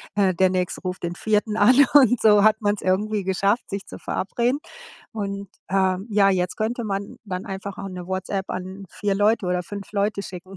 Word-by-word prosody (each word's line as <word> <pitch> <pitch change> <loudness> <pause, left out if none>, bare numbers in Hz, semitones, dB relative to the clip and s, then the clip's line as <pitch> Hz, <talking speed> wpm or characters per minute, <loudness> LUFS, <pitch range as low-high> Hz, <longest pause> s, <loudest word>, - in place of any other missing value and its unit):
äh, 195 -2 +3
der 185 +2 +3
Nächste 180 -1 -2
ruft 185 -1 -5
den 170 0 -2
Vierten 210 +2 0
an. 220 +4 +5 0.2
Und 255 -5 +6
so 210 -2 +5
hat 215 +1 +4
man's 205 -1 0
irgendwie 205 +3 0
geschafft, 195 +5 0
sich 200 -1 -5
zu - - -10
verabreden. 240 +7 -1 0.5
Und, 200 -2 -4 0.2
äh 190 -1 +2
ja, 200 -1 +4
jetzt 180 -2 0
könnte 230 +2 -2
man 200 -1 -4
dann 185 -2 -5
einfach 195 0 -6
auch 195 - -5
'ne 180 -1 -7
WhatsApp 190 +1 -3
an 185 +2 -6
4 205 -1 -1
Leute 205 0 +2
oder 180 0 0
5 200 +3 -8
Leute 200 0 0
schicken. 185 0 -9
200 Hz, 195 wpm, -23 LUFS, 185-210 Hz, 0.5 s, Und